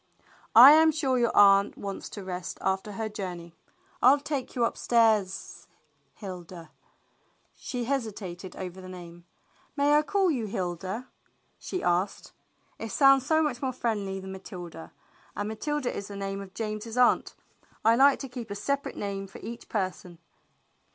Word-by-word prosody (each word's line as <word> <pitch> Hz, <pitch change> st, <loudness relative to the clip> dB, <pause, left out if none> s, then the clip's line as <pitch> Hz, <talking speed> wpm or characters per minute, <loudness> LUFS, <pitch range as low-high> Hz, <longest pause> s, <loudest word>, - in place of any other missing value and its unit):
"I 250 Hz, +5 st, +12 dB
am 315 Hz, +1 st, +6 dB
sure 270 Hz, -5 st, 0 dB
your 235 Hz, -1 st, +1 dB
aunt 200 Hz, 0 st, +6 dB
wants 200 Hz, -1 st, -6 dB
to 205 Hz, -, -8 dB
rest 180 Hz, -1 st, -5 dB
after 190 Hz, +2 st, -1 dB
her 220 Hz, +2 st, -3 dB
joucney. 180 Hz, -5 st, -7 dB, 0.5 s
I'll 265 Hz, +4 st, +6 dB
take 285 Hz, -2 st, -4 dB
you 240 Hz, -2 st, +2 dB
upstairs 220 Hz, -5 st, +1 dB, 0.2 s
— -, -, -42 dB
Hilda." 180 Hz, -4 st, -9 dB, 0.8 s
She 245 Hz, -3 st, -5 dB
hesitated 205 Hz, -8 st, -4 dB
over 185 Hz, 0 st, -7 dB
the 185 Hz, -, -10 dB
name. 175 Hz, -1 st, -11 dB, 0.2 s
" -, -, -36 dB
May 285 Hz, +1 st, +3 dB
I 300 Hz, -, +6 dB
call 385 Hz, +2 st, +1 dB
you 240 Hz, -7 st, -2 dB
Hilda? 190 Hz, +5 st, -4 dB, 0.3 s
" -, -, -43 dB
she 365 Hz, -, -5 dB
asked. 175 Hz, +3 st, -1 dB, 0.5 s
"It 225 Hz, -, -5 dB
sounds 270 Hz, +2 st, +5 dB
so 315 Hz, 0 st, +3 dB
much 260 Hz, -5 st, -2 dB
more 265 Hz, -2 st, -1 dB
friendly 205 Hz, -6 st, -2 dB
than 190 Hz, 0 st, -8 dB
Matilda, 175 Hz, -3 st, -9 dB, 0.4 s
and 205 Hz, -, -3 dB
Matilda 290 Hz, +4 st, -3 dB
is 200 Hz, -, -5 dB
the 200 Hz, -, -8 dB
name 195 Hz, 0 st, -4 dB
of 195 Hz, -1 st, -12 dB
James's 220 Hz, +1 st, -4 dB
aunt. 250 Hz, -1 st, +3 dB, 0.5 s
I 225 Hz, +1 st, +6 dB
like 275 Hz, +3 st, +5 dB
to 270 Hz, -, -5 dB
keep 245 Hz, -3 st, -8 dB
a 200 Hz, -, -4 dB
separate 280 Hz, +7 st, -2 dB
name 195 Hz, -1 st, -4 dB
for 195 Hz, -, -12 dB
each 235 Hz, +1 st, -8 dB
person." 185 Hz, -4 st, -3 dB
210 Hz, 165 wpm, -27 LUFS, 190-255 Hz, 0.8 s, I